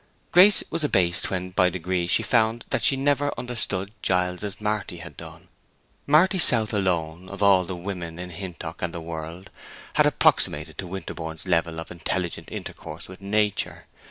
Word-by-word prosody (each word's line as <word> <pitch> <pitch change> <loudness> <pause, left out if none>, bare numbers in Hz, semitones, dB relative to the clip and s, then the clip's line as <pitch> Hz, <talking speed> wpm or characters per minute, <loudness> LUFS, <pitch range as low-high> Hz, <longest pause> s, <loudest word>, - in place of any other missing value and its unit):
Grace 190 +3 +7
was 165 0 -1
abased 90 -11 +2
when, 90 -1 -3
by 90 0 +4
degrees, 90 0 -2
she - - +3
found 115 +1 +2
that - - 0
she 135 - +5
had 135 +1 -3
never 145 0 +2
understood 115 -5 -2
Giles 90 0 +1
as 105 -1 -5
Marty 105 0 -2
had - - -10
done. - - -11 0.6
Marty 175 +6 +5
South 115 -8 +3
alone, 90 -3 -1
of 100 +1 -4
all 95 -2 +5
the 90 +1 -5
women 85 -2 -5
in 90 0 -6
Hintock 85 -1 -7
and 85 -1 -2
the - - -3
world, 80 +2 -7 0.4
had - - +5
approximated 75 +1 +2
to 95 - -3
Winterborne's 80 -3 -6
level 85 -2 +1
of 80 - -8
intelligent 85 0 -3
intercourse 75 +2 -7
with 95 +1 -12
nature. 105 +1 0
95 Hz, 170 wpm, -25 LUFS, 85-105 Hz, 0.6 s, Grace